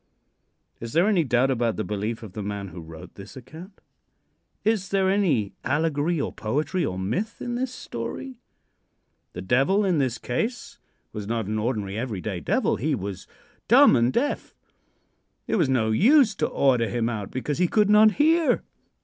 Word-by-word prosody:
Is 115 Hz, 0 st, -7 dB
there 170 Hz, +5 st, +3 dB
any 195 Hz, -6 st, +3 dB
doubt 130 Hz, 0 st, +2 dB
about 120 Hz, -3 st, 0 dB
the 110 Hz, -, -2 dB
belief 105 Hz, +3 st, -4 dB
of 105 Hz, -4 st, -10 dB
the 105 Hz, -, -5 dB
man 100 Hz, -1 st, -5 dB
who 90 Hz, -, -9 dB
wrote 80 Hz, 0 st, -11 dB
this 100 Hz, +7 st, -12 dB
account? 160 Hz, -, -12 dB, 0.8 s
Is 210 Hz, -4 st, +1 dB
there 190 Hz, -1 st, +2 dB
any 165 Hz, -, +1 dB
allegory, 155 Hz, +3 st, 0 dB
or -, -, -3 dB
poetry, 150 Hz, -, -2 dB
or 95 Hz, -11 st, -2 dB
myth 170 Hz, -, -3 dB
in 240 Hz, -, -4 dB
this 250 Hz, +1 st, -2 dB
story? 260 Hz, 0 st, -7 dB, 0.9 s
The 90 Hz, -, -7 dB
devil, 135 Hz, -, +2 dB
in 180 Hz, -5 st, +1 dB
this 130 Hz, -4 st, 0 dB
case, 220 Hz, -, -4 dB, 0.3 s
was 105 Hz, -2 st, -6 dB
not 115 Hz, -1 st, -2 dB
an 110 Hz, +2 st, -2 dB
ordinary, 105 Hz, -3 st, -2 dB
every 115 Hz, -5 st, -4 dB
day 85 Hz, -, -4 dB
devil. -, -, 0 dB
He 150 Hz, +3 st, 0 dB
was 100 Hz, -3 st, -6 dB, 0.4 s
dumb -, -, +7 dB
and 120 Hz, +1 st, +2 dB
deaf; 285 Hz, -, -2 dB, 0.9 s
it -, -, 0 dB
was 165 Hz, -8 st, +2 dB
no 115 Hz, -4 st, +1 dB
use 240 Hz, -, +5 dB
to 155 Hz, -, +1 dB
order 125 Hz, -4 st, +2 dB
him 120 Hz, -2 st, -1 dB
out, 105 Hz, -4 st, -4 dB
because 140 Hz, +4 st, -3 dB
he 180 Hz, -, +3 dB
could 210 Hz, +3 st, +2 dB
not 215 Hz, 0 st, +6 dB
hear. 320 Hz, +2 st, +2 dB
130 Hz, 175 wpm, -24 LUFS, -, 0.9 s, dumb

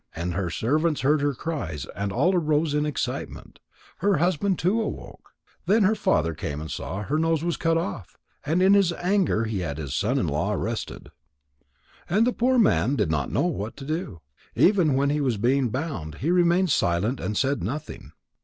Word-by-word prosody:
And 85 Hz, +2 st, -3 dB
her 90 Hz, 0 st, -2 dB
servants 155 Hz, -, 0 dB
heard 145 Hz, +2 st, +2 dB
her 145 Hz, -2 st, 0 dB
cries 120 Hz, -, -4 dB
and 100 Hz, 0 st, -3 dB
all 155 Hz, -, +2 dB
arose 155 Hz, -2 st, +1 dB
in 150 Hz, 0 st, +1 dB
excitement. 150 Hz, -, -5 dB, 0.4 s
Her 200 Hz, 0 st, +2 dB
husband 180 Hz, +3 st, +1 dB
too 200 Hz, +7 st, +1 dB
awoke. 220 Hz, -, -7 dB, 0.4 s
Then 210 Hz, +2 st, +4 dB
her 200 Hz, +3 st, +4 dB
father 85 Hz, -, +1 dB
came 75 Hz, -1 st, -5 dB
and 80 Hz, -2 st, -7 dB
saw 95 Hz, -, -5 dB
that 105 Hz, +3 st, -6 dB
her 155 Hz, +2 st, +1 dB
nose 165 Hz, -1 st, +1 dB
was 170 Hz, -1 st, 0 dB
cut 165 Hz, 0 st, +1 dB
off, 100 Hz, -, -5 dB, 0.3 s
and 165 Hz, +5 st, +1 dB
in 195 Hz, +1 st, +6 dB
his 200 Hz, -3 st, +4 dB
anger 180 Hz, -, +1 dB
he 110 Hz, -3 st, -2 dB
had 70 Hz, -5 st, -4 dB
his 70 Hz, -5 st, -5 dB
son -, -, 0 dB
in -, -, +1 dB
law -, -, -1 dB
arrested. -, -, -4 dB, 1.0 s
And 210 Hz, +6 st, +3 dB
the 250 Hz, -, +1 dB
poor 255 Hz, +2 st, +2 dB
man 200 Hz, -, +3 dB
did 105 Hz, -, 0 dB
not 75 Hz, -4 st, -1 dB
know -, -, +1 dB
what 105 Hz, +5 st, -3 dB
to 135 Hz, -, -8 dB
do. 155 Hz, -, -4 dB, 0.3 s
Even 180 Hz, -8 st, +4 dB
when 140 Hz, +1 st, +2 dB
he 150 Hz, 0 st, 0 dB
was 125 Hz, -6 st, 0 dB
being 125 Hz, +4 st, +2 dB
bound, 110 Hz, -, -4 dB
he 155 Hz, -, -1 dB
remained 175 Hz, 0 st, +3 dB
silent 100 Hz, +5 st, +1 dB
and 105 Hz, -, -3 dB
said 140 Hz, +1 st, 0 dB
nothing. 140 Hz, -, -6 dB
145 Hz, 195 wpm, -25 LUFS, 105-175 Hz, 1.0 s, in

